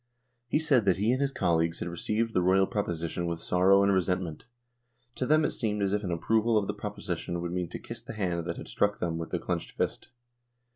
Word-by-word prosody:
He 120 - +2
said 145 -8 +3
that 95 -2 +3
he 105 +4 +2
and 130 +2 +1
his 140 -1 +1
colleagues 85 -7 +1
had - - -4
received 110 +6 -1
the 90 - +3
Royal 95 +2 +4
proposition 85 -4 -2
with 85 -1 -2
sorrow 95 +3 +4
and 100 0 +4
resentment. 90 -3 -1 0.7
To 130 - -1
them 155 +1 +4
it - - 0
seemed 105 -3 -1
as 100 0 +1
if 105 0 0
an 95 - -3
approval 110 +7 +2
of 105 - +2
the - - -2
proposition 85 - -4
would 85 0 -3
mean 90 -1 -2
to - - -5
kiss 115 -1 -8
the 115 - -8
hand 90 -5 -1
that - - -3
had - - -8
struck 105 0 +1
them 85 -2 -2
with 85 - -5
the 90 - -1
clenched 85 -1 -4
fist. - - -2
95 Hz, 230 wpm, -29 LUFS, 85-110 Hz, 0.7 s, Royal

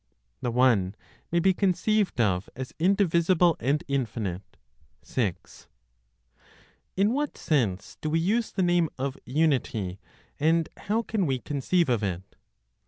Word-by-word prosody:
THE 120 - -1
ONE 115 -6 +3 0.4
MAY 170 - +3
BE 190 +2 +4
CONCEIVED 195 - +1
OF 95 -5 +1
AS 130 0 -6
INDIVISIBLE 175 -2 +3
AND 140 +7 0
INFINITE. 110 -9 -3 0.5
6. 100 -9 -4 1.3
In 205 +4 +3
what 290 +2 -2
sense 110 - -1
do 155 - -2
we 160 +2 +2
use 215 +7 0
the 190 - 0
name 175 -2 +2
of 135 +1 -2
unity, 125 - 0 0.4
and 160 +2 +2
how 220 +3 -1
can 210 -6 -1
we 135 -2 +1
conceive 150 +6 0
of 120 -4 +1
it? 95 -3 -2
150 Hz, 130 wpm, -27 LUFS, 115-180 Hz, 1.3 s, BE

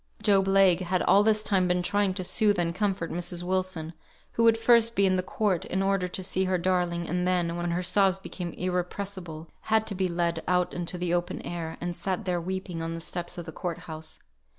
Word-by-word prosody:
Job 195 -3 +4
Legh 195 -2 +5
had 185 0 0
all 200 - +5
this 215 0 +3
time 190 -4 +2
been 180 0 +1
trying 205 +1 +1
to 185 0 -4
soothe 205 +2 +2
and 170 -1 0
comfort 190 -3 -1
Mrs. 175 0 -3
Wilson, 185 -3 -2 0.4
who 230 - 0
would 225 -1 +5
first 230 0 +4
be 200 - +4
in 185 -1 +3
the 185 - +1
court, 185 -1 -1
in 190 +1 -1
order 195 -2 +1
to 185 +1 -5
see 190 0 0
her 185 0 +1
darling, 175 -1 0
and 180 +2 -1
then, 175 -2 +1
when 175 0 -2
her 175 +2 -1
sobs 190 0 +3
became 180 -2 -6
irrepressible, 180 -2 -4 0.2
had 220 0 +3
to 205 - -2
be 190 -1 0
led 170 -1 -1
out 180 0 +1
into 175 +1 -3
the 175 -1 -1
open 175 0 -1
air, 165 -2 -5
and 175 0 -3
sat 190 +3 -3
there 180 -2 0
weeping, 185 -1 -4
on 165 0 -3
the - - -5
steps 175 +1 -5
of 170 - -5
the 160 - -7
court 170 +1 -4
house. 160 -2 -9
180 Hz, 220 wpm, -27 LUFS, 175-195 Hz, 0.4 s, Legh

